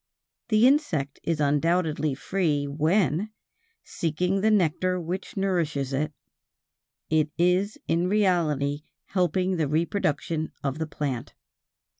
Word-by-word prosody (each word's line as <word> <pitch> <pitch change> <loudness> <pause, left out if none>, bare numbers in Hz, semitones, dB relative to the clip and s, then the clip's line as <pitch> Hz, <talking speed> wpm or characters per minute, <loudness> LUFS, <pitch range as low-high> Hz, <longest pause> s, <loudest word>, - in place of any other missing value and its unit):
The 215 +1 +5
insect 215 - +2
is 165 -2 -1
undoubtedly 155 0 +1
free 150 -2 0
when, 160 +5 +1 0.5
seeking 180 +4 -1
the 220 - +3
nectar 185 -2 +2
which 180 +4 -5
nourishes 160 -8 0
it, 150 +3 0 1.0
it 155 -1 +3
is 180 +4 +2
in 170 +2 +1
reality 160 -8 +1 0.2
helping 185 0 0
the 155 -3 +1
reproduction 160 0 -1
of 140 +2 -2
the 160 - -2
plant. 140 -5 -4
165 Hz, 110 wpm, -26 LUFS, 150-185 Hz, 1.0 s, The